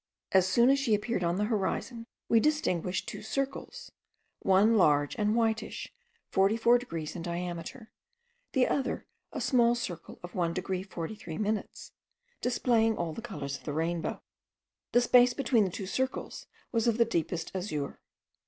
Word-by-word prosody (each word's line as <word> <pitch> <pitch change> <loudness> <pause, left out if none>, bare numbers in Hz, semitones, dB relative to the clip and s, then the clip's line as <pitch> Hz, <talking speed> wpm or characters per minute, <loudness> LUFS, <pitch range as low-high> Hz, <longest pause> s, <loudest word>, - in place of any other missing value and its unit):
As 190 -1 +5
soon 235 +7 +5
as 275 - +3
she 240 -6 +3
appeared 210 -2 -2
on 170 0 +1
the 205 - 0
horizon, 230 +2 -2 0.2
we 230 - +5
distinguished 190 - 0
two - - -6
circles: 275 - -4 0.5
one 200 +4 +4
large 145 -7 +3
and 210 -1 +1
whitish, 225 -1 -1 0.3
forty 195 +3 +2
four 235 +2 +5
degrees 165 -11 -5
in 175 - -5
diameter; 175 +5 -5 0.6
the 260 -1 +3
other 270 -2 -1 0.3
a - - -4
small 240 -3 +3
circle 175 -8 -6
of 175 - -8
1 170 -2 0
degree 185 0 -2
43 180 -2 -6
minutes, 215 0 -3 0.5
displaying 230 -3 +2
all 170 -2 -2
the 230 - -7
colours 140 -7 -5
of - - -20
the 145 - -4
rainbow. 165 +2 -2 0.7
The 245 - +5
space 245 0 +5
between 235 -6 +3
the - - -1
two 190 +2 -5
circles 260 +7 -3 0.2
was 230 -1 +1
of 230 -1 +2
the 235 - +5
deepest 170 -5 -2
azure. 175 -7 -3
210 Hz, 160 wpm, -30 LUFS, 175-235 Hz, 0.7 s, As